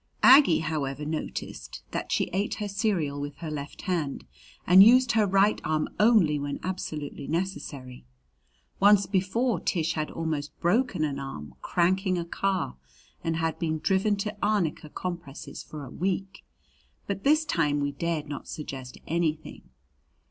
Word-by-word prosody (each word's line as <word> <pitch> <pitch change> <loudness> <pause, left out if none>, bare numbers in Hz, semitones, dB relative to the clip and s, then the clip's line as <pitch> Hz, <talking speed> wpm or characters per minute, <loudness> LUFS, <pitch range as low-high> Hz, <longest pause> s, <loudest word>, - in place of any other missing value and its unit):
Aggie, 265 - +8
however, 150 -3 -3
noticed 155 +1 -5
that - - -4
she - - 0
ate 200 +3 0
her 210 - -4
cereal 185 -8 -1
with 145 0 -5
her 160 -2 -6
left 145 -1 -6
hand 160 - -2 0.4
and 185 +2 +9
used 250 +3 +6
her 215 -2 +3
right 195 +2 +3
arm 155 0 0
only 210 -9 +4
when 140 0 -4
absolutely 155 -6 -5
necessary. 145 - -4 0.7
Once 200 0 +6
before 205 +5 0
Tish 165 -4 0
had 155 -1 -2
almost 155 -3 -4
broken 195 -1 +1
an 140 -2 -1
arm 75 - -7
cranking 185 +1 +1
a 170 - -2
car 185 - -1 0.5
and 165 0 0
had 165 0 -1
been 160 -2 -1
driven 195 +5 +1
to 210 +2 -4
arnica 185 -8 0
compresses 170 -5 -6
for 150 -2 -8
a 130 - -11
week; 195 +2 -3 0.6
but 195 -1 -4
this 310 +2 +4
time 150 - +1
we 145 0 -1
dared 155 +1 -2
not 145 -1 -6
suggest 135 -4 -7
anything. 160 -2 -2
170 Hz, 150 wpm, -27 LUFS, 150-195 Hz, 0.7 s, and